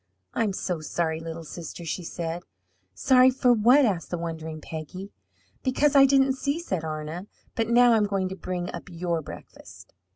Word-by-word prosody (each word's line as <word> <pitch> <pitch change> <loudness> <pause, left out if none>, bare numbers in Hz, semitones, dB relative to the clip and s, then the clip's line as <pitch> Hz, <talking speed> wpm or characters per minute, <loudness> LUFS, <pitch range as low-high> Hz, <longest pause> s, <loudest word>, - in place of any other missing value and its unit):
"I'm 220 -3 +1
so 180 -3 -3
sorry, 160 +1 -2
little 165 0 -7
sister!" 170 +1 -8
she 165 +3 -3
said. 170 0 -4 0.5
"Sorry 255 - +5
for 255 -1 +3
what?" 245 +6 +5
asked 190 -7 -1
the 175 - -2
wondering 160 -1 -5
Peggy. 165 +6 -8 0.5
"Because 280 +2 +2
I 275 0 +8
didn't 270 0 +4
see," 280 +3 -2
said 190 - -3
Arna. 155 +4 -5 0.3
"But 225 -1 -1
now 240 0 +6
I'm 215 -2 +3
going 195 -2 -1
to 190 - -5
bring 180 -1 -4
up - - -8
your 170 -1 -2
breakfast." - - -12
185 Hz, 170 wpm, -26 LUFS, 165-245 Hz, 0.5 s, I